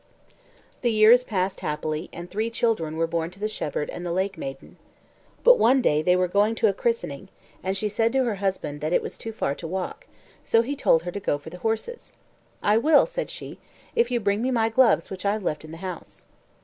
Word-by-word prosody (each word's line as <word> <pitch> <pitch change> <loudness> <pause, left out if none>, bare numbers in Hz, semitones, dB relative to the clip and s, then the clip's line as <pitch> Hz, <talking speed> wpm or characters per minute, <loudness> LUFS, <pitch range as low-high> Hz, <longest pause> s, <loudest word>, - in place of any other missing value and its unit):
The 240 - +2
years 225 +3 +6
passed 190 -4 -2
happily, 155 +2 -3
and 175 +1 -8
three 215 +5 -2
children 220 -9 -1
were 165 - +2
born 165 0 -2
to 185 +3 -17
the 210 - -1
shepherd 150 -8 -3
and 175 - -7
the 175 - -3
lake 190 +3 -1
maiden. 135 0 -8 0.7
But - - +7
one 255 +4 +5
day 150 -11 +2
here 180 +3 +3
were 180 0 +2
going 205 +5 +2
to 225 - +3
a 200 - +2
christening, 195 -7 -2 0.3
and 190 +1 -2
she 210 - -1
said 225 +2 +1
to 265 -1 +3
her 230 -5 -1
husband 150 -7 -2
it 155 +3 +1
was - - -6
far 220 -10 -3
to 165 - -7
walk, 190 - -5 0.4
so 230 0 +3
he 280 +5 -3
told 165 - +3
her 175 - -4
to 200 - -5
go 145 - 0
for 150 +2 -11
the 180 - -10
horses. 225 - -3 0.5
"I 210 +1 +4
will," 295 +5 +5
said - - -4
she, - - -8 0.4
"if 235 +1 +3
you 245 -1 0
bring 200 0 0
me 255 - 0
my 225 -3 +2
gloves 225 -8 +3
which 190 -1 -6
I've 205 +1 0
left 155 -4 -2
in 155 - -11
the 165 - -8
house." 180 -2 -8
200 Hz, 220 wpm, -25 LUFS, 170-230 Hz, 0.7 s, But